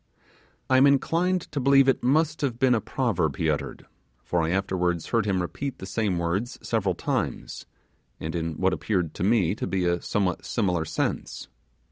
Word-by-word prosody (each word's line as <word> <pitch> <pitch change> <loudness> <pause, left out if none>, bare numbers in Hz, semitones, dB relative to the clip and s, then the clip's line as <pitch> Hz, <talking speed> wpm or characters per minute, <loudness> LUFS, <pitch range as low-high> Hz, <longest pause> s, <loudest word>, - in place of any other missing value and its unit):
I 130 - +4
am 135 +2 +7
inclined 170 +6 +2
to 145 - -2
believe 135 +1 +5
it 135 - +3
must 155 +5 +1
have 130 -5 -1
been 130 0 +3
a 115 - +1
proverb 100 - -1
he 80 -2 +1
uttered; 75 - -4 0.4
for 85 +7 0
I 80 - 0
afterwards 90 -2 -1
heard 115 -3 +1
him 95 -3 +1
repeat 135 +9 -5
the - - -8
same 100 -1 -1
words 85 +8 -2
several 100 -6 0
times, - - -3 0.5
and 80 0 -4
in 85 -1 -2
what 95 +4 +1
appeared 90 -1 -1
to - - -4
me 100 -4 +3
to - - -4
be 95 -2 0
a 85 0 +1
somewhat: 95 -5 -1
similar 90 -8 0
sense. - - -3
100 Hz, 180 wpm, -26 LUFS, 85-130 Hz, 0.5 s, am